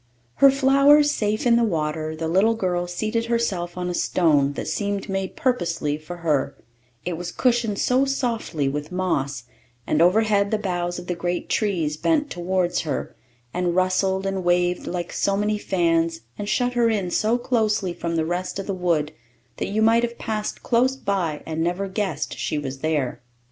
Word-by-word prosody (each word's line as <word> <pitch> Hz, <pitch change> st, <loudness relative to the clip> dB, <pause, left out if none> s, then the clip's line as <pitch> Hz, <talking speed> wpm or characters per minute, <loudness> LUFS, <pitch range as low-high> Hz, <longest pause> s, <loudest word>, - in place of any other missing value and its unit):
Her 275 Hz, -, +8 dB
flowers 275 Hz, +2 st, +5 dB
safe 215 Hz, -3 st, -1 dB
in 235 Hz, -1 st, +5 dB
the 235 Hz, -, +3 dB
water, 155 Hz, -5 st, -1 dB
the 160 Hz, +1 st, -3 dB
little 195 Hz, +7 st, +3 dB
girl 180 Hz, -4 st, -1 dB
seated 215 Hz, +6 st, -2 dB
herself 195 Hz, -7 st, -1 dB
on 180 Hz, 0 st, -2 dB
a 180 Hz, -, -2 dB
stone 150 Hz, -6 st, +2 dB
that -, -, -5 dB
seemed 200 Hz, -1 st, -2 dB
made 195 Hz, -1 st, -3 dB
purposely 170 Hz, -, 0 dB
for 155 Hz, +3 st, -8 dB
her, 150 Hz, -4 st, +1 dB, 0.5 s
it 175 Hz, -2 st, -2 dB
was 175 Hz, +1 st, -5 dB
cushioned 235 Hz, -5 st, +1 dB
so 255 Hz, +5 st, +2 dB
softly 235 Hz, -, -1 dB
with 150 Hz, +3 st, -3 dB
moss; 145 Hz, -9 st, -1 dB, 0.4 s
and 155 Hz, -, +1 dB
overhead 200 Hz, +2 st, +3 dB
the 215 Hz, -, +1 dB
boughs 175 Hz, -4 st, -2 dB
of 180 Hz, -, -7 dB
the 180 Hz, -, -2 dB
great 175 Hz, +1 st, -3 dB
trees 170 Hz, -8 st, 0 dB
bent 300 Hz, -, +1 dB
towards 180 Hz, 0 st, 0 dB
her, 150 Hz, -4 st, -4 dB, 0.4 s
and 175 Hz, -1 st, 0 dB
rustled 190 Hz, +1 st, +1 dB
and 195 Hz, -1 st, -2 dB
waved 175 Hz, 0 st, +1 dB
like 175 Hz, -1 st, -4 dB
so 195 Hz, 0 st, +1 dB
many 210 Hz, +1 st, 0 dB
fans, 165 Hz, -4 st, +1 dB
and 205 Hz, 0 st, -5 dB
shut 245 Hz, 0 st, +1 dB
her 240 Hz, -1 st, +3 dB
in 200 Hz, -5 st, -1 dB
so 220 Hz, +6 st, +2 dB
closely 215 Hz, -6 st, 0 dB
from 170 Hz, -1 st, -3 dB
the 160 Hz, -1 st, +1 dB
rest 175 Hz, +3 st, -3 dB
of 195 Hz, -, -4 dB
the 200 Hz, -, -2 dB
wood 170 Hz, -5 st, 0 dB, 0.5 s
that -, -, -2 dB
you 215 Hz, +2 st, +1 dB
might 225 Hz, +1 st, +5 dB
have 235 Hz, 0 st, -3 dB
passed 215 Hz, -1 st, -4 dB
close 255 Hz, +2 st, +2 dB
by, 185 Hz, -, -2 dB
and 160 Hz, 0 st, -3 dB
never 180 Hz, +3 st, -1 dB
guessed 190 Hz, -6 st, -3 dB
she 155 Hz, -, -1 dB
was 135 Hz, -2 st, -4 dB
there. 150 Hz, -4 st, -1 dB
185 Hz, 180 wpm, -23 LUFS, 170-220 Hz, 0.5 s, Her